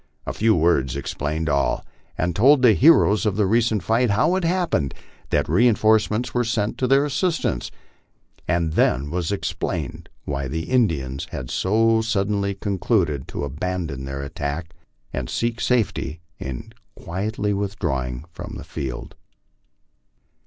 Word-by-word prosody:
A - - -3
few 110 0 +3
words 75 -6 +2
explained 75 +3 -3
all, 70 -2 +1 0.3
and 90 -1 -1
told 130 +5 +5
the 120 -3 +7
heroes 110 - +5
of 100 - 0
the 105 -1 +2
recent 110 -1 +2
fight, 115 +5 +2
how 140 - +3
it 190 - -1
happened 170 - 0 0.3
that - - +1
re 95 +11 +4
inforcements 110 +1 +2
were 125 - +2
sent 110 0 -1
to 130 - +1
their 135 +2 +4
assistance; 160 +4 -1 0.8
and 85 -2 +1
then 70 -1 +2
was 90 -1 -1
explained 100 - -3 0.2
why 70 -2 -2
the 80 +5 -3
Indians 80 - 0
had 65 -1 -6
so 110 +3 +2
suddenly 100 -2 0
concluded 95 - 0
to - - -5
abandon 75 -1 -3
their 70 +1 -5
attack 75 +2 -4 0.4
and 65 -1 -3
seek 115 0 -1
safety 110 -9 0 0.2
io 65 -2 -4 0.3
quietly 105 +4 -2
withdrawing 80 - -2
from - - -7
the - - -8
field. 65 -3 -6
100 Hz, 140 wpm, -23 LUFS, 75-115 Hz, 0.8 s, the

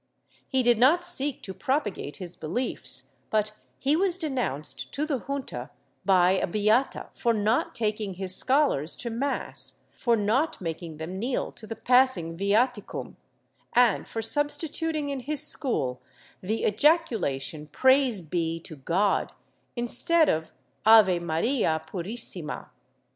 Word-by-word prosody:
He 260 -2 +1
did 240 -2 +4
not 325 +8 +5
seek 290 -6 +1
to 190 - -6
propagate 205 - -2
his 180 -2 -8
beliefs, 180 +12 -3
but 215 -1 0 0.3
he 280 +3 +1
was 365 +1 +2
denounced 250 - -3
to 290 +3 0
the 290 -4 -1
Junta 260 - -5 0.4
by 185 -2 +4
a 190 - +1
beata 215 +7 +1
for 235 - 0
not 215 +3 0
taking 210 -3 -2
his 185 0 0
scholars 260 - +2
to 235 - -5
mass, 270 +5 -4 0.2
for 235 -2 +2
not 230 +9 0
making 165 -2 -6
them 170 +4 -6
kneel 245 +4 -2
to 215 - -12
tlie 225 0 -8
passing 250 -10 +4
viaticum, 205 +4 -1 0.6
and 240 -4 +3
for 225 - -4
substituting 295 +4 0
in 280 -1 -3
his 295 +3 +2
school 135 - +1 0.4
the 215 +4 -2
ejaculation 210 - +1
''Praise 260 - +3
be 165 0 -2
to 160 -2 -10
God" 180 +9 0 0.4
instead 300 +7 +3
of 160 0 -1 0.3
"Ave 215 -5 +6
Maria 170 - 0
purissima." 185 -4 -5
225 Hz, 130 wpm, -26 LUFS, 180-270 Hz, 0.6 s, Ave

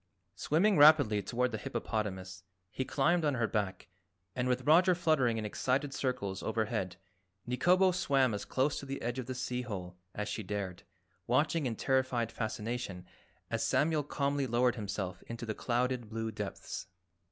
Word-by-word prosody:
Swimming 170 - +2
rapidly 145 -9 +7
toward 125 +3 0
the 110 - -3
hippopotamus, 95 -5 -3 0.3
he 130 - -2
climbed 155 +6 +2
on 145 -3 +2
her 115 -2 +1
back 100 -4 -2 0.5
and 125 0 0
with 125 -1 0
Roger 175 +4 +6
fluttering 145 -9 +2
in 110 - -3
excited 135 +6 -1
circles 125 -8 -2
overhead 105 -5 -1 0.5
Nikobo 180 +10 +4
swam 135 - +2
as 105 - -3
close 135 +3 0
to 140 - -9
the 135 0 -4
edge 120 +2 -2
of 125 - -5
the 130 - -4
sea 125 0 -2
hole 95 -7 -6 0.2
as 105 0 -3
she - - -3
dared, 95 -3 -4 0.5
watching 155 -1 +2
in 115 - -2
terrified 130 -2 +1
fascination 110 -4 -4 0.5
as - - 0
Samuel 155 0 +2
calmly 140 -1 -1
lowered 120 +1 +3
himself 100 -4 -4
into 115 0 -6
the 110 - -2
clouded 120 0 -1
blue 110 0 -3
depths. 105 -2 -6
125 Hz, 160 wpm, -32 LUFS, 105-140 Hz, 0.5 s, rapidly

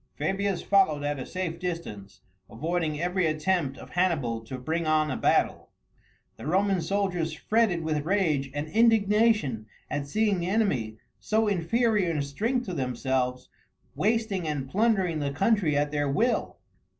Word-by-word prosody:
Fabius 195 +4 -1
followed 170 -8 +3
at 145 -1 -2
a 130 - -6
safe 175 -3 -4
distance, 165 - -6 0.3
avoiding 155 +4 -2
every 180 +1 +1
attempt 155 -2 0
of - - -12
Hannibal 155 -11 0
to 130 +3 -6
bring 160 +6 -2
on 155 -1 +2
a - - -1
battle. - - +1 0.7
The - - -8
Roman 190 +2 +2
soldiers 180 -3 -1
fretted 200 0 +1
with 155 -2 -1
rage 160 -7 +1
and 145 +1 -3
indignation 210 - +3 0.2
at 145 -1 -2
seeing 210 +3 +1
the 170 - -2
enemy, 150 - 0 0.2
so 220 0 +1
inferior 205 +1 +1
in 150 -3 -1
strength 225 - -1
to 185 - -5
themselves, 125 -2 -2 0.4
wasting 215 -4 0
and 145 -3 -2
plundering 190 - +1
the 145 -1 -1
country 170 0 +1
at 145 0 0
their 145 -1 0
will. 230 - 0
170 Hz, 150 wpm, -27 LUFS, 145-200 Hz, 0.7 s, followed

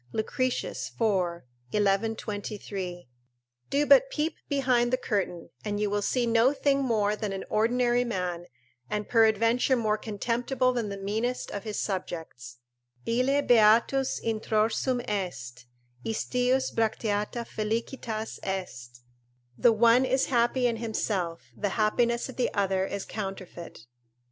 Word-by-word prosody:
Lucretius, 255 +3 -2
iv. 185 -6 +1 0.3
1123.] 205 - -2 0.6
do 290 +1 +2
but - - +6
peep 315 -7 -1 0.2
behind 255 -4 +2
the 255 - +3
curtain, 195 -8 -2
and 205 -1 -2
you 210 -1 0
will 205 0 0
see 245 +4 +1
no 235 +3 +4
thing 280 -1 +1
more 215 -5 +1
than 210 -1 -3
an 195 0 -4
ordinary 240 +2 +2
man, 180 -6 -3 0.4
and 210 -1 -2
peradventure 230 +3 +3
more 215 -3 0
contemptible 245 +4 0
than 235 -4 -2
the 200 - -5
meanest 220 +6 -2
of 200 +1 -5
his 215 -1 -4
subjects: 160 - -5 0.5
"Ille 255 +5 +2
beatus 235 +4 +4
introrsum 225 +3 0
est, 130 -12 -4 0.4
istius 250 +3 0
bracteata 220 +1 -1
felicitas 220 0 -3
est;" 125 -11 -5 0.5
["The 240 - +5
one 230 +3 +5
is 260 +1 +2
happy 240 +2 +2
in 235 -2 +1
himself; 205 -7 -2
the 205 0 -2
happiness 235 +2 +2
of 260 - -10
the 250 - +1
other 195 -1 +1
is 200 -1 -4
counterfeit." 190 - -7
220 Hz, 125 wpm, -28 LUFS, 200-245 Hz, 0.6 s, but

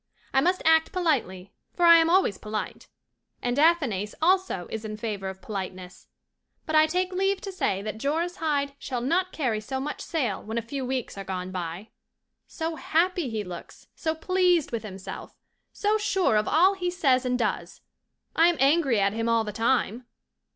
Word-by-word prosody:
I 270 - +4
must 360 +5 +1
act 320 0 +4
politely 230 - -1 0.2
for 350 - +2
I 335 0 +9
am 330 0 +3
always 350 - +3
polite 215 0 -5 0.5
and 245 0 -1
Athanase 275 - +2
also 360 - +2
is 220 0 -4
in 215 -1 -5
favour 210 -3 -4
of 190 0 -10
politeness 185 -3 -7 0.6
but 315 - -2
I 310 0 +6
take 365 +3 -1
leave 390 +1 +1
to 390 - -5
say 200 - -1
that 215 0 -5
Joris 325 +7 -1
Hyde 285 -3 -1
shall 250 -3 -4
not 355 +8 +1
carry 245 -8 -1
so 265 +5 -4
much 295 +3 -4
sail 255 - -2
when 220 +2 -5
a - - +1
few 265 +4 -5
weeks 255 -5 -3
are - - -4
gone 185 -1 -5
by. 180 +3 -5 0.6
So 325 -1 -4
happy 340 -2 +1
he 220 -2 -3
looks! 180 -3 -10
So 320 0 -2
pleased 360 -1 +2
with 230 -2 -2
himself! 195 -3 -9 0.3
So 425 +1 0
sure 385 - +1
of 210 0 +2
all 365 +5 +5
he 360 -2 -2
says 275 -8 +2
and 250 -1 0
does! 195 -7 -3 0.5
I 330 +1 +6
am 345 -2 +2
angry 275 -4 +3
at 200 0 +2
him 225 +1 -1
all 230 -1 +3
the 210 - -5
time. 235 +1 0
265 Hz, 185 wpm, -26 LUFS, 215-335 Hz, 0.6 s, I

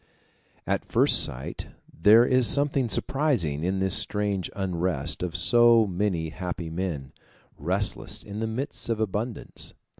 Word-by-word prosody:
At - - -1
first - - +4
sight 65 +2 -5 0.3
there 110 +8 +5
is 130 -2 +4
something 140 -1 +3
surprising 105 - 0
in 95 +2 -1
this 95 -1 0
strange 100 -3 -1
unrest 90 -6 -2
of 90 -1 -4
so 115 +5 +5
many 90 -4 -2
happy 85 -1 -6
men, 80 -6 -4 0.4
restless 95 +8 -2
in 100 +1 -8
the 110 - -2
midst 120 +3 -5
of 115 -2 -1
abundance. 110 +2 -4
100 Hz, 130 wpm, -25 LUFS, 85-115 Hz, 0.4 s, there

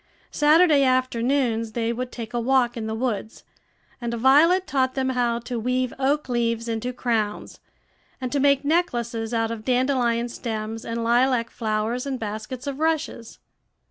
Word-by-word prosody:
Saturday 300 -1 +5
afternoons 255 -3 +1
they 230 0 -1
would 250 +1 -4
take 230 -1 -7
a 240 - 0
walk 245 0 +2
in 225 -2 -4
the 220 - -3
woods; 225 -2 -3 0.6
and 235 -1 -3
Violet 300 +10 +4
taught 260 -4 0
them 265 -1 0
how 245 -2 +1
to 240 0 -4
weave 250 +2 -1
oak 280 +2 +1
leaves 230 -1 -1
into 230 +2 -2
crowns, 225 -4 -2 0.6
and 255 -2 -4
to 285 - 0
make 280 0 +3
necklaces 240 -9 0
out 225 -1 0
of 225 -2 -6
dandelion 245 -2 +1
stems 225 -2 -5
and 230 0 -3
lilac 240 0 +2
flowers, 225 +3 -2
and 265 -2 -3
baskets 220 +4 -5
of 280 0 -4
rushes. 315 -7 -2
245 Hz, 155 wpm, -24 LUFS, 230-265 Hz, 0.6 s, Saturday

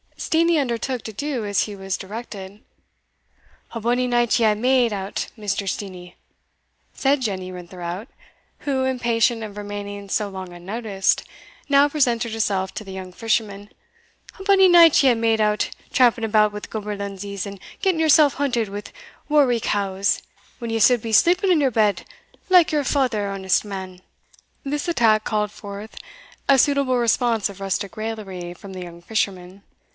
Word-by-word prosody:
Steenie 330 0 +2
undertook 250 -1 -2
to 220 - -7
do 265 -1 -3
as 205 -1 +1
he 210 - -6
was 195 -1 -3
directed. 205 -1 -8 1.1
"A 230 - -4
bonny 245 +3 +1
night 240 0 +2
ye 230 - +3
hae 215 - +4
made 245 0 +2
o't, 195 0 -4
Mr. 200 -2 -2
Steenie," 180 -3 -6 0.8
said 275 0 +1
Jenny 190 -5 -3
Rintherout, 180 +3 -7 0.5
who, 270 -2 -1
impatient 240 -3 +1
of 210 -1 -8
remaining 205 -1 -6
so 210 +1 0
long 190 -2 -8
unnoticed, 195 +2 -1 0.5
now 280 +1 +5
presented 240 -6 0
herself 195 -4 -1
to - - -5
the 195 - -10
young 185 -1 -7
fisherman 210 -2 -2 0.7
"A - - -7
bonny 385 -1 +6
night 340 -4 +7
ye 270 - +6
hae 245 - +4
made 225 -1 +1
o't, 210 0 +1 0.2
tramping 240 -2 +3
about 215 -1 +3
wi' 210 - -6
gaberlunzies, 200 -2 -5
and 200 -1 -8 0.2
getting 375 -4 +1
yoursell 310 -2 +6
hunted 245 -6 -1
wi' 205 +1 -6 0.5
worricows, 210 -9 +1 0.4
when 235 -2 -4
ye 225 - 0
suld 245 +1 +5
be 225 - -5
sleeping 365 - +4
in 340 - +4
your 270 -2 +2
bed, 210 -3 +1 0.4
like 360 -4 +5
your 300 -2 +1
father, 245 -7 0
honest 190 0 0
man." 190 -2 -7 0.6
This 290 +2 -3
attack 225 -10 +3
called 210 -1 -1
forth 205 +1 -9 0.5
a 275 - +6
suitable 280 -2 +2
response 235 -2 +1
of 200 -1 -11
rustic 195 +1 -3
raillery 200 -5 -5
from 195 +2 -11
the 185 - -7
young 170 -1 -10
fisherman. 190 -1 -3
215 Hz, 155 wpm, -22 LUFS, 200-255 Hz, 1.1 s, night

